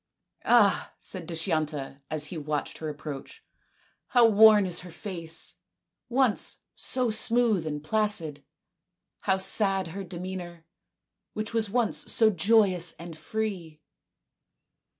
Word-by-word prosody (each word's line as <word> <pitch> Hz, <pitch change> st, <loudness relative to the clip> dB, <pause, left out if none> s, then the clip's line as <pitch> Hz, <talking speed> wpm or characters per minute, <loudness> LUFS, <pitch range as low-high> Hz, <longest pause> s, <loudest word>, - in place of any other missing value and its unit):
"Ah," 220 Hz, -5 st, +3 dB
said 185 Hz, -4 st, -7 dB
Dushyanta, 155 Hz, -5 st, -3 dB
as 155 Hz, -1 st, +1 dB
he 165 Hz, -, -6 dB
watched 150 Hz, 0 st, -4 dB
her 155 Hz, -, -4 dB
approach. 150 Hz, -, -8 dB, 0.3 s
" -, -, -39 dB
How 240 Hz, -1 st, +7 dB
worn 215 Hz, -2 st, +6 dB
is 175 Hz, -2 st, +2 dB
her 180 Hz, -, -10 dB
face, 170 Hz, -2 st, -3 dB, 0.5 s
once 255 Hz, -3 st, +1 dB, 0.2 s
so 250 Hz, -3 st, -1 dB
smooth 225 Hz, -5 st, +2 dB
and 150 Hz, -1 st, -5 dB
placid! 165 Hz, -7 st, +1 dB, 0.8 s
How 190 Hz, -, +1 dB
sad 195 Hz, -2 st, +1 dB
her 195 Hz, +4 st, -6 dB
demeanour, 175 Hz, -2 st, -7 dB, 0.7 s
which 215 Hz, +1 st, -5 dB
was 225 Hz, -2 st, 0 dB
once 235 Hz, +1 st, 0 dB
so 220 Hz, -1 st, +4 dB
joyous 190 Hz, -2 st, +3 dB
and 170 Hz, 0 st, -10 dB
so 155 Hz, -, -15 dB
free 185 Hz, -7 st, -4 dB
185 Hz, 125 wpm, -27 LUFS, 160-215 Hz, 0.8 s, How